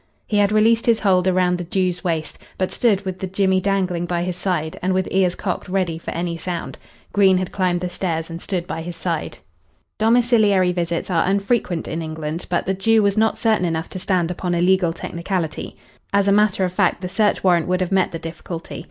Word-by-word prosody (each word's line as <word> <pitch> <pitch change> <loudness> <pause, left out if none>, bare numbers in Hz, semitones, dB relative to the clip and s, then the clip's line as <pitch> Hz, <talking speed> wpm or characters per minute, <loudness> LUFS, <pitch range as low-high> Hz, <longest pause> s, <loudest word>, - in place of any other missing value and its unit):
He 210 - -1
had 205 0 +3
released 225 +2 +3
his 230 -2 +3
hold 185 -3 +3
round 180 -1 +2
the - - -3
Jew's 180 0 -1
waist, 165 -3 -2 0.2
but 185 - -1
stood 205 -5 +1
with 185 -1 -4
the 190 - -3
jemmy 190 0 +1
dangling 185 -3 0
by 175 0 -1
his 180 0 -3
side 175 -4 -2
and 185 +1 0
with 190 -1 0
ears 185 -2 +2
cocked 185 -1 -4
ready 180 -4 -1
for - - -7
any 170 0 -3
sound. 170 0 -5 0.3
Green 195 -2 +5
had 185 -1 -2
climbed 180 -2 0
the 180 - -1
stairs 165 -3 -2
and 165 0 -7
stood 180 -4 -3
by 165 -2 -4
his 170 +1 -6
side. 165 -3 -3 0.6
Domiciliary 220 -5 +4
visits 170 0 -2
are 165 -1 +2
unfrequent 195 -3 0
in 165 +1 -3
England, 160 +1 -5
but 175 -1 0
the 190 - 0
Jew 220 +3 +3
was 200 -1 +2
not 220 0 +2
certain 220 -4 +2
enough 165 -1 -2
to 185 - -6
stand 180 -2 0
upon 180 0 -2
a - - 0
legal 185 -1 +3
technicality. 170 -1 -4 0.3
As 200 0 +2
a - - +4
matter 205 -2 +3
of 180 - -4
fact, 190 -2 +1
the 180 - -3
search 210 +3 +1
warrant 175 -3 +3
would 185 +1 0
have 185 - -1
met 190 -1 +3
the 165 - -5
difficulty. 165 +1 -7
185 Hz, 215 wpm, -21 LUFS, 170-195 Hz, 0.6 s, Green